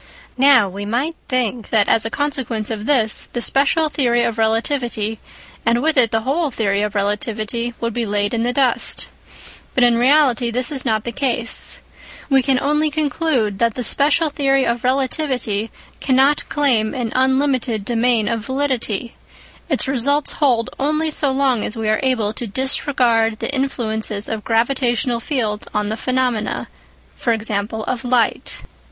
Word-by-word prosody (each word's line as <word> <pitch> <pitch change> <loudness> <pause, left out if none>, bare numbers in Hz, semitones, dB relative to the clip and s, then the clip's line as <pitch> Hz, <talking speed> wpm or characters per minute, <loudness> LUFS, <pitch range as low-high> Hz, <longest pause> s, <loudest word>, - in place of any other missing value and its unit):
Now 265 -6 +6
we 195 +2 -7
might 250 +10 -2
think 245 -4 -1
that 210 -3 +3
as 225 - +2
a - - -1
consequence 255 -6 -3
of 215 -1 -5
this, 230 -7 +2
the 240 - -2
special 285 +6 +2
theory 240 -5 +1
of 230 -1 -2
relativity 225 -1 0 0.4
and 230 +1 +2
with 320 0 +2
it 250 -4 +4
the 225 0 0
whole 290 +6 0
theory 205 -5 -1
of 210 0 -2
relativity 215 +3 -2
would 230 -1 -2
be 235 -1 -2
laid 205 +1 -1
in 230 - 0
the 240 +1 +1
dust. 255 -2 0 0.7
But 255 - +3
in 240 -1 +4
reality 255 -3 +3
this 245 +2 0
is 275 -3 -1
not 220 -3 0
the 235 - -4
case. 240 -2 0 0.5
We 270 -1 +5
can 260 -1 +1
only 300 +2 +1
conclude 285 - -1
that 230 -2 +1
the 250 - -3
special 295 +6 +2
theory 275 -2 +1
of 235 0 -1
relativity 255 -5 -1 0.3
cannot 270 +2 +2
claim 245 -7 +1
an 240 -3 -3
unlinlited 260 -4 +1
domain 235 -2 +1
of 230 -2 -2
validity; 260 -4 -2 0.6
its 270 -4 +1
results 275 +3 +2
hold 250 -6 +1
only 305 +3 0
so 290 -1 0
long 265 -4 +1
as 225 - -4
we 220 -1 -2
are 215 0 +2
able 240 -6 0
to 240 - -4
disregard 235 -2 +1
the 275 - -4
influences 220 -6 -3
of 220 -1 -4
gravitational 240 0 0
fields 225 -5 -2
on 210 0 0
the 220 - -2
phenomena 255 -3 -1 0.6
(e.g. 225 -2 -1
of 220 +4 -3
light). 245 -2 0
240 Hz, 160 wpm, -19 LUFS, 220-270 Hz, 0.7 s, Now